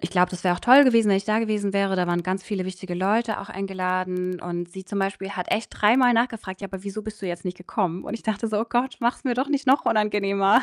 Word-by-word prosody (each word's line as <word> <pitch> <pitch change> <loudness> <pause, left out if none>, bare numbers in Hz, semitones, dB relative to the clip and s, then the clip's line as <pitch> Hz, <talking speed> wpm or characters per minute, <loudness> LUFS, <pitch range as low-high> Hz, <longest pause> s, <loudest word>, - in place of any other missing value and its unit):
ich - - -3
glaube, 180 -1 +3
das 180 0 -8
wäre 180 -1 +3
auch - - -11
toll 265 +3 +8
gewesen, 230 -4 +4
wenn 195 - +4
ich 195 - -2
da 215 +1 +1
gewesen 210 -3 -1
wäre. 200 -1 +1
Da 180 -1 +1
waren 175 0 0
ganz 185 +2 -2
viele 195 -3 -3
wichtige 185 -1 -6
Leute 215 +5 0
auch 200 - -10
eingeladen 185 -2 -2
und 175 0 -5
sie 190 0 -9
zum 200 +1 -3
Beispiel 195 0 -3
hat 180 -2 -5
echt 225 - -1
dreimal 245 +4 +4
nachgefragt: 225 -5 -1
„Ja, 195 - -5
wieso 200 +2 -6
bist 215 -1 -8
du - - -3
jetzt 175 -2 -5
nicht 180 -1 -4
gekommen?“ 180 -1 -2
Und - - -5
ich 230 - -7
dachte 220 0 -2
so: 215 -1 0
„Oh 230 - -2
Gott, 245 +2 0
mach's 240 +4 -1
mir 250 -3 +1
doch 260 +3 -1
nicht 285 -1 -1
noch 265 +2 +4
unangenehmer.“ 205 +1 +3
200 Hz, 265 wpm, -24 LUFS, 185-225 Hz, -, toll